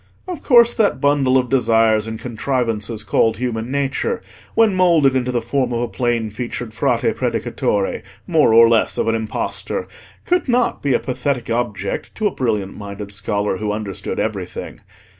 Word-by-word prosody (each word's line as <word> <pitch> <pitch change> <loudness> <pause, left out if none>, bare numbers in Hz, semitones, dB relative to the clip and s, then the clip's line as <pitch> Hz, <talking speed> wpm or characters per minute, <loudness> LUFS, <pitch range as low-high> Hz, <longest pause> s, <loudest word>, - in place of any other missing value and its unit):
Of 360 -5 -5
course 240 -3 +5
that 215 -3 +1
bundle 140 -2 +3
of 125 -1 +1
desires 115 -4 +3
and 110 0 -5
contrivances 115 -3 -2
called 110 +2 +2
human 115 -1 -3
nature, 140 - -1 0.3
when 225 -3 +4
moulded 170 -7 +4
into 125 -1 0
the 120 -2 -1
form 125 +1 0
of 120 0 -1
a 120 - -1
plain 120 -2 -1
featured 120 0 -5
Frate - - +1
Predicatore, 100 -2 -1 0.2
more 160 -8 +3
or 115 +1 +8
less 115 -1 +2
of - - 0
an 115 - +2
impostor, 110 -1 -3 0.4
could 360 -2 +1
not 245 0 +1
be 140 -3 +1
a - - +2
pathetic 130 -2 -2
object 105 -5 -3
to 220 - -2
a 205 - +3
brilliant 105 -6 -1
minded 100 0 -7
scholar 100 0 -1
who 105 0 -2
understood 105 -2 -4
everything. - - -4
120 Hz, 165 wpm, -19 LUFS, 110-140 Hz, 0.4 s, or